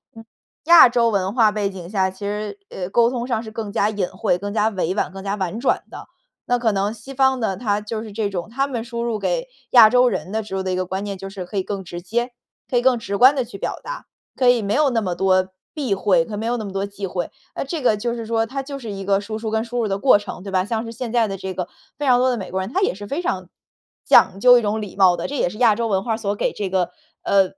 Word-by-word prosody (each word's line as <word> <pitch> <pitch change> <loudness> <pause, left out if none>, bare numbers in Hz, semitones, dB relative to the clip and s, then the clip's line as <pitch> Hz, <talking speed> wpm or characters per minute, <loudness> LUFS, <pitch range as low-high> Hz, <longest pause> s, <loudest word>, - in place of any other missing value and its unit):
嗯， 225 - -11 0.4
亚 340 -5 +10
洲 235 -1 +2
文 195 -2 0
化 225 -3 +4
背 205 -1 -1
景 180 -3 -9
下， 190 -2 +1
其 190 - -14
实， 210 - -4
呃， 180 -1 -5
沟 235 +3 +4
通 245 -1 -3
上 230 -3 -1
是 220 - -9
更 220 -2 -5
加 210 -2 +2
隐 205 -4 -1
晦、 175 - -1
更 205 +2 -5
加 220 0 +2
委 185 -3 -2
婉、 205 - -1
更 195 - -8
加 200 +1 -2
婉 190 +2 -3
转 265 - +1
的。 - - -9 0.4
那 245 - +3
可 235 -2 +1
能 200 +1 -1
西 230 +5 -11
方 265 -1 +2
的， 195 -4 -1
它 210 -3 -1
就 215 +1 -4
是 220 -2 -9
这 210 -1 -1
种 185 +1 -5
它 270 +4 -1
们 250 -5 -3
输 235 0 -4
入 230 -2 -2
给 - - -1 0.2
亚 230 -4 +9
洲 250 +2 +4
人 195 - -2
的 220 +1 -1
植 210 -2 -7
入 190 - -2
的 185 - -2
一 180 - -1
个 185 - -1
观 190 +2 -4
念 200 -1 -5
就 195 +1 -7
是 195 -1 -6
可 200 +3 -6
以 190 - +2
更 195 0 -5
直 175 -1 -7
接 235 +7 -2 0.4
可 250 - +1
以 - - +3
更 250 -1 +3
直 200 -2 -4
观 260 +6 +7
地 260 - 0
去 230 -4 -10
表 - - -4
达， - - -7 0.3
可 255 - +1
以 245 -2 +5
没 200 0 -1
有 295 0 +3
那 230 -2 +1
么 185 -4 -2
多 185 +1 +2 0.2
避 275 -9 -1
讳， 200 +5 +3
可 220 -4 -7
以 - - -5
没 220 - -4
有 240 +1 0
那 230 - -4
么 200 - -6
多 195 +1 -2
忌 200 0 -6
讳。 180 -2 -3 0.2
那 - - -4
这 315 +2 -4
个 220 -5 +3
就 235 +2 -2
是 230 -1 -5
说 225 0 0
它 270 +4 -4
就 275 0 -7
是 235 -4 -7
一 195 -1 -6
个 195 0 +2
输 215 +2 -5
出 220 -1 -4
跟 220 0 +1
输 245 +1 -5
入 220 - -1
的 195 - 0
过 255 -4 +6
程， 205 -3 -8
对 195 - -7
吧？ 185 -1 +2
像 225 +2 -2
是 230 - -6
现 235 0 -5
在 235 -2 +2
的 195 - -4
这 190 0 -5
个 180 -1 -4 0.3
非 290 - -3
常 250 -2 +5
多 255 +1 +3
的 245 - 0
美 195 - -6
国 190 +1 -2
人， 190 - -5
他 375 - 0
也 385 - +2
是 205 +2 -9
非 285 +10 -2
常 355 - -3 0.6
讲 190 +1 +5
究 245 +3 +7
一 240 - +2
种 215 +1 -1
礼 205 -3 -7
貌 185 -3 +5
的， 170 - -3
这 290 - -5
也 180 - +1
是 210 - -10
亚 230 -3 +4
洲 230 +1 -1
文 190 -2 +1
化 230 - -1
儿 - - -2
所 205 -3 -2
给 - - -1
这 200 -2 -3
个 185 -2 0 0.3
呃， 200 -1 +4
215 Hz, 325 characters per minute, -21 LUFS, 195-240 Hz, 0.6 s, 亚